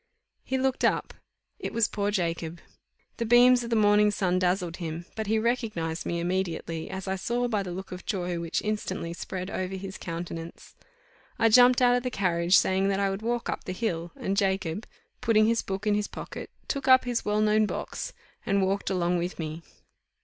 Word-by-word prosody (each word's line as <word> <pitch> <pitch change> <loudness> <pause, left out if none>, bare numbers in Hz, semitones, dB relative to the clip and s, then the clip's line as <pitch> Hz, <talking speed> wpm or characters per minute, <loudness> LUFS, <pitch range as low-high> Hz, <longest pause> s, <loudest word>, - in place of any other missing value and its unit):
He 265 - -1
looked 260 0 0
up. - - +1 0.5
It - - -5
was 230 -2 +3
poor 205 -1 -1
Jacob. 170 -4 -2 0.6
The 235 - -1
beams 245 +1 +6
of 235 - -5
the 230 - +1
morning 210 -1 +5
sun 185 -3 +1
dazzled 180 -1 0
him; 165 -1 -5
but 220 -1 -3
he 220 +1 +2
recognized 215 -8 -1
me 170 - -1
immediately, 170 -2 -2
as 190 0 -6
I 190 - 0
saw 240 +6 -1
by 215 -4 0
the 185 -2 -5
look 190 +2 -7
of 180 0 -8
joy 180 -3 -2
which 170 0 -2
instantly 190 -5 -3
spread 185 +2 -5
over 185 +1 -3
his 190 0 -7
countenance. 165 -1 -7 0.6
I 225 -2 +4
jumped 250 +2 +6
out 245 0 +5
of 245 - +1
the 250 - -2
carriage, 180 -4 +3
saying 190 +1 +2
that 195 0 +1
I 195 -1 +1
would 195 +2 -4
walk 235 +1 -1
up - - -3
the 185 - -3
hill, 175 -5 -2
and 195 - -2
Jacob, 195 -1 0 0.3
putting 215 -1 +4
his 230 +1 +2
book 195 +2 -4
in 210 - +3
his 205 0 0
pocket, - - -8 0.2
took 275 -2 -3
up 260 0 +7
his 245 -1 -1
well 210 0 0
known 215 0 +3
box, - - -4 0.3
and 195 -2 +2
walked 195 +1 -1
along 180 -2 +1
with 175 +2 -3
me. 160 0 -5
195 Hz, 200 wpm, -27 LUFS, 175-220 Hz, 0.6 s, up